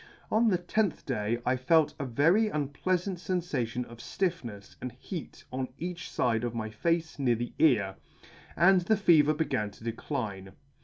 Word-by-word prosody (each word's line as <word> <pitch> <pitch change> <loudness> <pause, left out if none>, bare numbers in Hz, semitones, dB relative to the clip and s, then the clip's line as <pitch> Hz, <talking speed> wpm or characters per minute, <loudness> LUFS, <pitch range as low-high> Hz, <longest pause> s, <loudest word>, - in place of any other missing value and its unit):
On 225 +2 +4
the 190 -5 +3
tenth 185 +2 -1
day 115 -3 -1
I 125 - +3
felt 150 +5 +3
a 140 - -2
very 165 - +4
unpleafant 175 +4 -1
fenfation 145 - -2
of 120 0 -13
ftiffnefs, 120 - -3
and 125 - -5
heat 155 +6 -8
on 130 0 -2
each 175 +1 -5
fide 115 -2 +1
of 120 -1 -2
my 110 -1 -3
face 165 +7 -1
near 125 -4 +3
my 120 +1 -4
ear, 105 -11 +3 0.6
and 185 +2 +5
the 210 +5 +2
fever 155 -6 +5
began 125 -9 -1
to 100 - -16
decline. 110 -5 -4
140 Hz, 160 wpm, -29 LUFS, 115-175 Hz, 0.6 s, and